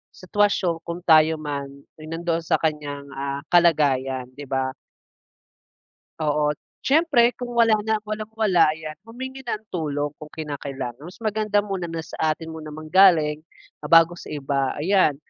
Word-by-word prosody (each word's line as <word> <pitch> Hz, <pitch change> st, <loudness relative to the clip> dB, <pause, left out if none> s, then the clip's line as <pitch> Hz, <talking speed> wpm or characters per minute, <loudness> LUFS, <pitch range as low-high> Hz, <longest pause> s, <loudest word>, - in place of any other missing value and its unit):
sitwasyon 185 Hz, -3 st, +1 dB
kung 170 Hz, +1 st, -5 dB
tayo 160 Hz, -1 st, +5 dB
man, 145 Hz, -2 st, -4 dB, 0.3 s
ay 155 Hz, -, -10 dB
nandoon 165 Hz, +1 st, -1 dB
sa 165 Hz, -, +1 dB
kaniyang, 150 Hz, -3 st, -2 dB
ah, 140 Hz, +1 st, -4 dB
kalagayan, 140 Hz, -7 st, +3 dB
'di 140 Hz, +2 st, -10 dB
ba. 130 Hz, 0 st, -1 dB, 1.5 s
Oo. 150 Hz, 0 st, +1 dB, 0.3 s
Siyempre, 275 Hz, -5 st, +4 dB
kung 245 Hz, -1 st, -6 dB
wala 230 Hz, -1 st, +5 dB
na, 220 Hz, 0 st, +1 dB
walang-wala, 215 Hz, -5 st, +1 dB
ayan 155 Hz, -1 st, -7 dB, 0.2 s
humingi 260 Hz, +3 st, -7 dB
ng 220 Hz, -3 st, -4 dB
tulong 145 Hz, -4 st, -2 dB
kung 155 Hz, -, -9 dB
kinakailangan. 140 Hz, -5 st, -6 dB
Mas 175 Hz, +5 st, -10 dB
maganda 215 Hz, -1 st, 0 dB
muna 190 Hz, -4 st, -3 dB
na 165 Hz, -1 st, -4 dB
sa 160 Hz, -1 st, -1 dB
atin 160 Hz, -1 st, -8 dB
muna 155 Hz, -1 st, -8 dB
manggaling, 155 Hz, -1 st, +4 dB, 0.4 s
ah, 150 Hz, -, -5 dB
bago 165 Hz, +1 st, +7 dB
sa 175 Hz, -, -11 dB
iba. 140 Hz, -2 st, -1 dB
Ayan, 165 Hz, -2 st, +3 dB
160 Hz, 145 wpm, -23 LUFS, 145-195 Hz, 1.5 s, bago